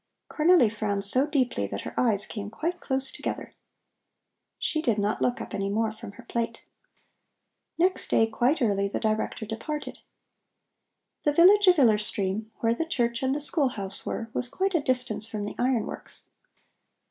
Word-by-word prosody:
Cornelli 325 -4 +5
frowned 205 -2 -1
so 255 +8 +4
deeply 255 - 0
that 100 0 -5
her - - -7
eyes 215 -4 +2
came 205 -2 -6
quite 335 +10 -3
close 265 0 -1
together. - - -5 1.0
She 310 - -1
did 230 -8 +1
not 205 +1 -1
look 245 +1 +1
up - - -7
any 195 -1 -2
more 220 +2 0
from 220 -2 -10
her 245 - -13
plate. 230 -1 -4 1.1
Next 370 +2 +1
day 225 - +4
quite 245 +6 +1
early 200 -3 +1
the 200 - -3
Director 220 0 -1
departed. 295 +8 -5 1.2
The 295 - +1
village 390 +6 +6
of 360 -1 +7
Iller 225 -7 +5
Stream, 210 +1 -1
where 230 0 +3
the 285 - -1
church 240 -6 -1
and 265 +1 +1
the 295 - -2
school 290 -1 +3
house 195 -5 -4
were, 225 -1 -4
was 245 - -2
quite 385 +8 -1
a 335 - +2
distance 255 -4 0
from 215 -2 -4
the 205 - -5
iron 245 -2 +1
works. - - -9
235 Hz, 170 wpm, -27 LUFS, 210-290 Hz, 1.2 s, of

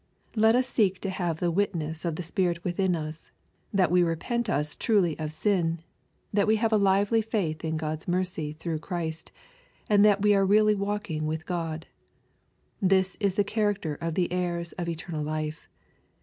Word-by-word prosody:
Let 220 +1 +5
us 255 0 +2
seek 195 -7 +1
to 195 - -2
have 175 -4 -2
the 175 -1 +1
witness 165 -4 -1
of 165 -2 -1
the 180 - -4
Spirit 170 0 -1
within 180 0 +1
us, 155 0 -6 0.4
that 185 -4 +2
we 180 0 +5
repent 210 +8 -1
us 150 -2 -1
truly 200 -8 +2
of 155 -1 -3
sin, 170 -1 0 0.5
that 200 0 +3
we 220 - +5
have 220 0 +1
a - - +6
lively 200 +3 +3
faith 190 -8 -2
in 160 0 -1
God's 155 0 -4
mercy 180 -4 -1
through 160 0 -4
Christ, 160 -2 -4 0.6
and 205 -1 +5
that 205 -1 +4
we 210 0 +5
are 195 -1 +4
really 210 +2 +5
walking 200 -6 -2
with 160 +1 -3
God. 165 -2 -3 1.0
This 190 0 +3
is 200 -3 +1
the 205 - +3
char 210 +1 +1
acter 155 -5 -4
of 165 -1 -2
the 175 -2 0
heirs 175 -1 -2
of 175 -2 -4
eternal 165 -1 -4
life. 155 +1 -4
180 Hz, 180 wpm, -27 LUFS, 160-200 Hz, 1.0 s, a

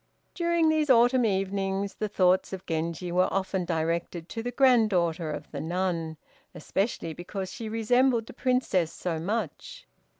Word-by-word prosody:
During 340 -2 +2
these 310 -2 +1
autumn 245 0 +5
evenings 195 0 -1
the 215 - -3
thoughts 185 -2 +2
of 190 0 -6
Genji 165 +2 -3
were 180 +1 +2
often 190 -1 -1
directed 170 0 -2
to 225 - -4
the 245 - -3
granddaughter 210 - +3
of 150 - -6
the - - -5
nun, 170 -2 -2 0.4
especially 170 0 -2
because 185 +3 -6
she 225 +1 -6
resembled 235 +2 +2
the - - -11
Princess 245 -10 +1
so 170 -3 -3
much. 230 - -4
195 Hz, 145 wpm, -27 LUFS, 170-235 Hz, 0.4 s, autumn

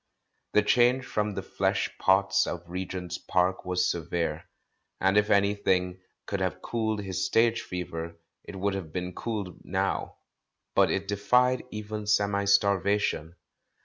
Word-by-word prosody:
The 105 - +5
change 125 +4 +3
from 105 -4 -1
the - - -3
flesh - - -1
pots 95 0 +3
of 85 0 -5
Regent's 90 0 -5
Park 90 +1 0
was 90 0 +1
severe, 85 -1 -3 0.5
and 95 +1 +2
if 105 0 +3
any 100 0 +4
thing 90 -2 0 0.3
could 100 - -3
have 90 -1 -1
cooled 110 -2 -1
his 95 -1 -2
stage 115 +3 +3
fever, 85 -2 -6 0.2
it - - -9
would 100 +1 -1
have 95 -5 -5
been 90 +1 -4
cooled 105 -6 -5
now, - - -2 0.6
but - - +4
it 100 0 -1
defied 125 +6 +2
even 105 -1 -6
semi 100 -1 +2
starvation. 100 -4 +2
95 Hz, 145 wpm, -28 LUFS, 90-105 Hz, 0.6 s, The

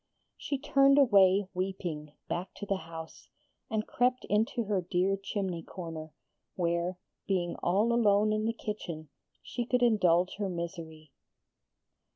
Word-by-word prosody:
She 280 - -3
turned 275 0 +4
away 200 -7 +5
weeping, 175 -5 -4
back 180 +2 -4
to 205 - -6
the 195 -1 0
house, 160 -1 -9 0.4
and 220 -1 -1
crept 250 +1 +1
into 220 +3 +2
her 205 -3 0
dear 180 +2 +1
chimney 195 -3 -3
corner; 160 -3 -7 0.4
where, 170 0 0 0.3
being 175 -3 0
all 205 +7 +2
alone 215 -2 +4
in 215 0 0
the 225 - +2
kitchen, 170 -9 -6 0.3
she 245 - -3
could 245 +1 +1
indulge 185 -7 +3
her 200 -2 -1
misery. 165 -3 -6
195 Hz, 135 wpm, -30 LUFS, 170-215 Hz, 0.4 s, away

